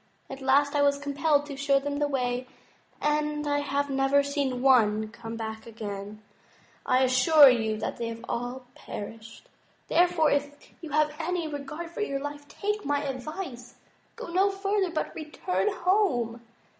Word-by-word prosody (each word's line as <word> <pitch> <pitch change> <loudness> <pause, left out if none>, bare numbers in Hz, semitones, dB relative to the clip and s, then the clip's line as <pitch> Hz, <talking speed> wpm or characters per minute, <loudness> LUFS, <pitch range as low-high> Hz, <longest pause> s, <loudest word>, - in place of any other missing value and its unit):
At 270 0 -7
last 280 +2 +3
I 290 - +2
was 280 0 +3
compelled 285 +1 +1
to 290 -1 -7
show 275 0 +2
them 285 +1 -2
the 295 - +2
way, 250 -2 -1 0.5
and 300 0 0
I 290 0 +1
have 285 0 -1
never 270 +1 +2
seen 280 -3 -2
one 220 -5 +4
come 230 0 -8
back 220 0 -6
again. 210 -1 -7 0.6
I 255 +1 +4
assure 260 +3 +7
you 220 -3 +1
they 230 +2 -3
have 230 0 -7
all 245 +2 -4
perished. 225 - -9 0.4
Therefore, 345 -3 +3
if 290 0 -3
you 325 - -7
have 300 +1 +2
any 340 0 -1
regard 300 +3 -6
for 385 - -5
your 275 -10 -1
life, 290 0 -7
take 420 +4 -3
my 285 0 0
advice. 265 -2 -6 0.4
Go - - -8
no 385 +2 +4
further, 395 -1 0
but 325 - -3
return 330 +6 -2
home." 340 - +1
280 Hz, 155 wpm, -27 LUFS, 245-305 Hz, 0.6 s, assure